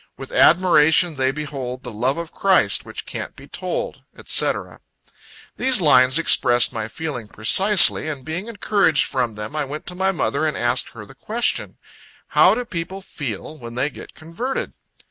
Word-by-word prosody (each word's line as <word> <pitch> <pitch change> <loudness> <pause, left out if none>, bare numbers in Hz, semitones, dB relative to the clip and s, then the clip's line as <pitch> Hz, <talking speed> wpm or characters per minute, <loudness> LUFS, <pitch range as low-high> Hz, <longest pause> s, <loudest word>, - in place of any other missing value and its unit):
With - - -10
admiration 175 - +4
they 130 -1 0
behold 135 -3 -6
The 125 - -7
love 125 +7 -1
of 170 -1 -6
Christ, 195 -1 +2
which - - -8
can't - - -7
be - - -14
told," - - -5 0.2
&c. - - +2 1.1
These 255 -2 +3
lines 130 -5 +4
expressed 120 -7 +3
my 110 -2 -4
feelings 130 -5 -6
precisely, 190 - +4
and 145 -4 -6
being 170 +7 -5
encouraged 205 -8 +1
from 125 -4 -2
them, 105 +7 -7
I 150 - -1
went 145 +2 -7
to 180 - -5
my 190 +1 0
mother, 155 -4 -2
and 150 - -3
asked 120 +1 0
her 105 -3 -10
the - - -15
question 220 - -2 0.5
"How - - +4
do 245 +1 -4
people 185 -1 -6
feel, 140 - -7
when 115 -1 -9
they 135 +4 -1
get - - -13
converted?" 170 +12 -5
155 Hz, 165 wpm, -20 LUFS, 125-185 Hz, 1.1 s, admiration